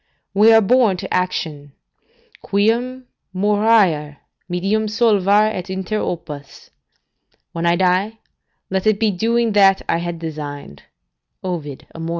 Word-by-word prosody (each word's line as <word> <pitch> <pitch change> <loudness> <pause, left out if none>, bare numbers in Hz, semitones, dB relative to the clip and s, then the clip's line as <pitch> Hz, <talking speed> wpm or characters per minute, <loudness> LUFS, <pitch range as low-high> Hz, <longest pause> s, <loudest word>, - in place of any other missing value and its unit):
We 210 +3 +5
are 225 0 +7
born 220 -2 +3
to - - -6
action: 155 -6 -3 0.7
"Quum 240 +6 0 0.3
moriar, 200 -7 +2 0.3
medium 195 +5 0
solvar 210 -1 +3
et 185 -1 -6
inter 190 +3 -3
opus." 150 -7 -7 0.8
["When 170 0 -2
I 170 - +4
shall - - 0
die, 190 +4 +1 0.5
let 190 +2 -1
it 215 -2 +2
be 220 -2 +2
doing 230 +4 0
that 195 -2 +4
I - - +1
had 175 0 -4
designed." 145 - -7 0.6
Ovid, 160 -7 -5
Amor. 165 0 -6
190 Hz, 130 wpm, -19 LUFS, 170-215 Hz, 0.8 s, are